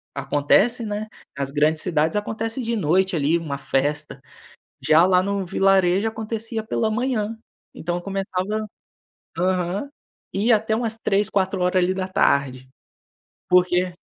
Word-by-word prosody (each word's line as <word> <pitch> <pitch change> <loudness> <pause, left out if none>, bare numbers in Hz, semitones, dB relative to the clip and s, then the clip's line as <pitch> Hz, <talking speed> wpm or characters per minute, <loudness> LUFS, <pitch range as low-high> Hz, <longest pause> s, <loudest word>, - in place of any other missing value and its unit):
acontece, 145 - +2
né. 210 0 -4 0.3
Nas 140 -1 -2
grandes 155 +2 +2
cidades 160 -2 0
acontecem 225 +4 -2
de 235 0 -1
noite 185 +1 +1
ali, 155 +2 +2
uma 155 -4 -4
festa. 145 +2 -2 0.6
Já, 160 +3 +5
lá 185 -1 +4
no 200 0 -2
vilarejo 195 +1 +2
acontecia 225 0 -4
pela 220 0 -1
manhã, 225 -2 -1 0.4
então 175 +1 -3
começava 195 +2 -3 0.7
Aham. 185 +6 -1 0.5
Ia 220 +4 +4
até 220 +1 -1
umas 225 -1 -2
15h, 200 0 +1
16h 185 -1 +1
ali, 180 +1 +2
da 190 0 -2
tarde. 135 -8 +1 0.8
Porque 180 0 +3
190 Hz, 130 wpm, -22 LUFS, 165-215 Hz, 0.8 s, Já